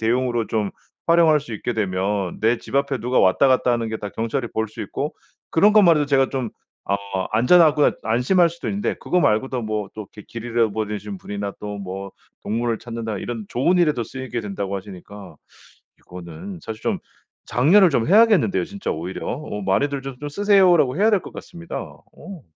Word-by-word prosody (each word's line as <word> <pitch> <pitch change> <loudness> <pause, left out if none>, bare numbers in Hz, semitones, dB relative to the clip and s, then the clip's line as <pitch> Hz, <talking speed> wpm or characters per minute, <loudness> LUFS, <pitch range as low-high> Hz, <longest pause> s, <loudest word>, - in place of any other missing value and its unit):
대용으로 120 0 0
좀 105 -3 -1 0.4
활용할 165 -2 +5
수 120 -5 -8
있게 120 +3 -3
되면 95 -2 -2
내 115 +2 +2
집 - - -11
앞에 140 -1 +1
누가 125 +3 +1
왔다 95 +9 +4
갔다 130 -1 +3
하는 115 -1 -1
게 110 - -3
다 105 - -6
경찰이 115 +4 -3
볼 110 0 -1
수 105 - -7
있고 - - -4 0.4
그런 205 +6 +5
것만 185 -7 +6
해도 150 - +2
제가 135 -1 +2
좀 130 -5 -3 0.4
어 100 - +2 0.4
'안전하구나.' 150 +5 +5
안심할 125 - +3
수도 170 +1 -7
있는데 205 +1 -1
그거 180 - 0
말고도 120 +2 +1
뭐 110 -2 -3
또 110 - -6
이렇게 105 - -13
길 115 0 -7
잃어버리신 105 -3 -2
분이나 100 +1 -5
또 105 -1 -5
뭐 95 0 -6 0.3
동물을 115 +1 -1
찾는다 115 -3 -5
이런 115 +1 -5
"좋은 155 +9 +1
일에도 150 -9 +2
쓰이게 130 -1 -5
된다."고 100 -2 -4
하시니까 95 -2 -10 0.6
이거는 90 +1 -9
사실 110 -1 -7
좀 - - 0 0.5
장려를 170 - +5
좀 120 -6 +1
해야겠는데요 210 -1 +4
진짜 200 0 -5
오히려. 85 +4 -5
어 120 -7 -5
"많이들 140 +9 0
좀 135 -1 -7
좀 145 - -4
쓰세요."라고 180 -5 +4
해야 215 +3 +4
될 205 - +4
것 - - -10
같습니다. 170 -2 -9
어. 190 -6 -11
120 Hz, 380 characters per minute, -22 LUFS, 105-150 Hz, 0.6 s, 것만